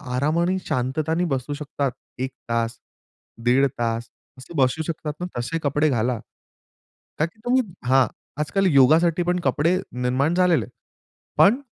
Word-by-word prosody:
आराम 150 +6 +1
आणि 180 +2 +1
शांतताने 155 +7 0
बसू 135 -2 -2
शकतात. 145 -2 -2 0.3
1 130 +1 -2 0.2
तास, 115 0 -1 0.7
दीड 130 +3 +5
तास 115 0 -1 0.3
असं 130 +6 -12
बसू 130 +3 +2
शकतात 155 -2 -3
ना 180 - -3
तसे 120 +7 -2
कपडे 150 +2 +2
घाला. 120 -2 0 1.0
का 155 - +3
की 170 +7 -12
तुम्ही 255 +2 +4 0.3
हां 130 +1 +5 0.4
आजकाल 195 +6 0
योगासाठी 160 +6 +5
पण 180 +1 0
कपडे 170 +4 +2 0.3
निर्माण 135 +6 +1
झालेले 180 -3 +3
आहेत. - - -18 0.7
पण 220 +7 +6
145 Hz, 145 wpm, -23 LUFS, 130-170 Hz, 1.0 s, पण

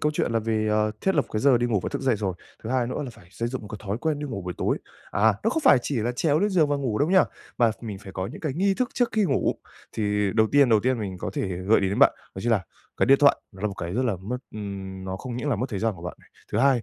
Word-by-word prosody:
câu 150 0 +1
chuyện 135 - 0
là 115 - +2
về, 110 -1 0
ờ, 105 0 +2
thiết 190 - +1
lập 145 - +3
cái 110 - 0
giờ 130 -3 +5
đi 120 - +1
ngủ 105 -5 +1
và - - -2
thức - - -3
dậy 130 -5 +2
rồi, 95 -3 -2 0.3
thứ 110 - -5
hai 125 -2 +1
nữa 130 - -3
là 125 - -6
phải 85 -6 -18
xây 115 +3 -3
dựng 130 +1 -4
một 105 - -9
cái 105 -2 -7
thói 100 +4 -1
quen 155 0 -1
đi 150 - -4
ngủ 105 -8 -5
buổi 90 0 -4
tối. - - 0 0.3
À, 105 +1 +3
nó 225 - +3
không 315 +5 -1
phải 135 - +7
chỉ 140 - -2
là 120 +3 0
trèo 145 +4 +2
lên 205 +4 +2
giường 165 -6 +3
và 145 - +1
ngủ 125 -6 -1
đâu 150 +5 +2
nha, 190 -1 +6 0.3
mà 115 -2 +5
mình 105 -5 -6
phải 95 -2 -11
có 95 0 -3
những 130 +9 -9
cái 155 -5 -2
nghi 195 +3 +2
thức 255 +2 0
trước 245 -2 +2
khi 215 -2 +2
ngủ. - - +1 0.4
Thì 105 -2 0
đầu 110 -1 +4
tiên 140 -3 +6
đầu 110 -2 +5
tiên 130 0 +1
mình 95 -3 -4
có - - -4
thể 95 - -2
gợi 100 +5 +3
ý 95 - +1
đến 100 - -2
bạn, - - +7 0.2
đó 95 - -6
chính 120 - 0
là 95 -5 +1 0.3
cái - - +2
điện 135 +1 +6
thoại 145 -1 +6 0.2
nó 95 - -13
là 105 - +1
một 100 - -6
cái 85 -1 -5
rất 130 - +1
là 110 -6 0
mất 105 +8 -4 0.2
ừm, 95 -2 -6
nó 95 0 -4
không 125 +3 -6
những 145 +4 -3
là 120 - +1
mất 125 - -1
thời 100 - -3
gian 110 0 0
của 85 - -12
bạn, 90 - -6 0.4
thứ - - +1
hai, 135 -4 +4
115 Hz, 325 wpm, -25 LUFS, 100-140 Hz, 0.4 s, phải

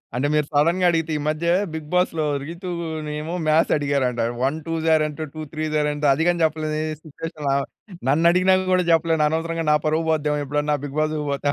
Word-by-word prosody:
అంటే, 130 +3 0
మీరు 150 -1 +2
సడెన్‌గా 170 +5 +3
అడిగితే. 165 -2 0
ఈ - - -4
మధ్య 155 +2 -1 0.3
బిగ్ 155 -2 -6
బాస్‌లో 175 -3 +1 0.2
రీతూ‌నేమో 165 -2 -5
మాథ్స్ 155 +2 +3
అడిగారంట. 140 -4 0 0.2
వన్ 140 +4 +1
టూ‌స్ 165 0 -2
ఆర్ 155 - +2
ఎంత? 155 +1 -6
టూ 155 - -5
త్రీ‌స్ 155 0 -2
ఆర్ 150 - +1
ఎంత? 145 0 -3
అది 160 +4 0
కూడా 175 0 +2
చెప్పలేని 155 0 0 0.2
సిట్యుయేషన్‌‌లో 155 -1 -6
ఆమ. 140 - +1 0.5
నన్ను 160 +4 +2
అడిగిన 185 +1 +3 0.2
కూడా 185 - +3
చెప్పలేను. 165 -1 +3
అనవసరంగా 165 +1 -2
నా 150 - +5
పరువు 160 +1 +1
పోద్దేమో 150 -1 0
ఎప్పుడన్నా 150 +1 0
బిగ్ 145 +2 -7
బాస్ 155 0 0 0.2
పోతే. 140 +1 -1
155 Hz, 185 wpm, -22 LUFS, 150-165 Hz, 0.5 s, నా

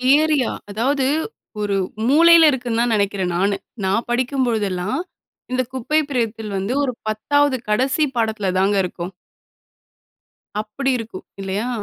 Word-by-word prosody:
Area. 300 -5 +2 0.2
அதாவது 260 +6 +1 0.6
ஒரு 205 -1 0 0.3
மூலையில 330 +1 +7
இருக்குன்னு 245 -3 -2
தான் 240 -2 +2
நினைக்கிறன் 200 -3 0
நானு. 200 +2 +2 0.3
நான் 200 +5 0
படிக்கும்பொழுதெல்லாம் 240 - 0 0.5
இந்த 255 0 +1
குப்பை 260 +5 +1
பிரித்தில் 225 -5 -2
வந்து 195 +6 -2
ஒரு 255 -3 -1
10வது 285 +6 +2
கடைசி 260 +8 +2
பாடத்துல 220 -4 0
தாங்க 200 +2 +2
இருக்கும். 180 0 -5 1.5
அப்படி 220 +6 -2
இருக்கும் 225 -5 -8 0.2
இல்லையா? 195 +4 -2
230 Hz, 115 wpm, -21 LUFS, 205-265 Hz, 1.5 s, மூலையில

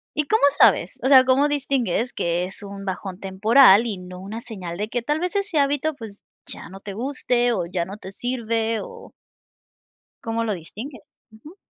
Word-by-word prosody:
¿Y 300 - 0
cómo 435 -8 +1
sabes? - - +4
O - - +2
sea, 260 -2 +7
cómo 265 +3 +3
distingues 260 -6 -1
que 170 +1 -1
es 190 +2 -9
un 200 0 -8
bajón 190 0 -5
temporal 210 +3 +5
y 210 -4 -3
no 180 0 -10
una 210 +5 -7
señal 185 -7 -7
de 210 +1 -2
que 245 0 -2
tal 295 +4 -1
vez 360 +3 -3
ese 385 -6 0
hábito, 290 +2 +1
pues 215 -4 -11 0.2
ya - - -9
no 195 +1 -11
te 200 -1 -8
guste 245 0 0
o 180 -5 -1
ya 170 -1 -2
no 195 +3 -9
te 190 -2 -10
sirve 230 -1 -2
o 475 -1 -11 1.1
¿cómo 230 0 -2
lo 215 -2 -1
distingues? 215 - -9 0.3
Ujú. 295 - -15
225 Hz, 190 wpm, -23 LUFS, 195-270 Hz, 1.1 s, sea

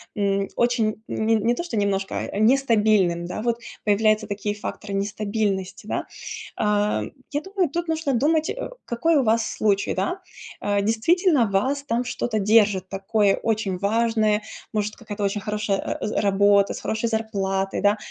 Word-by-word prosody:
м, 200 -1 +1
очень, 225 -3 +1
м, 220 - -2
н 225 -2 +3
не 235 - +4
то, 245 - -3
что 345 - -5
немножко, 195 -2 0 0.2
а 200 - -3
нестабильным, 215 -8 +3
да. 180 +4 -4
Вот 235 0 0 0.2
появляются 215 +1 +3
такие 205 0 -3
факторы 205 0 -6
нестабильности, 200 -1 -2
да. - - -2 0.5
А, 210 0 +1 0.3
я 290 0 -1
думаю, 380 -2 -1
тут 345 +3 -3
нужно 320 -3 0
думать, 305 +6 +2
э, - - -4 0.2
какой 295 +7 +2
у 275 - +3
вас 225 0 +2
случай, 200 -2 +1
да. 360 +2 -2 0.4
Э, 205 0 +1
действительно, 255 - +3
вас 265 +9 +1
там 240 -2 -1
что-то 240 -2 -2
держит 205 -2 +3
такое 195 +1 +1
очень 215 -4 -1
важное, 215 0 +1 0.3
может, 210 -1 -2
какая-то 210 -2 -6
очень 200 +1 -1
хорошая, 210 -1 -1
э, - - -3
э, - - -1
з 215 - -3
работа, 200 0 +4
с - - -6
хорошей 220 +1 -2
зарплатой, 195 -4 -1
да. 205 +2 +3
215 Hz, 165 wpm, -24 LUFS, 200-235 Hz, 0.5 s, не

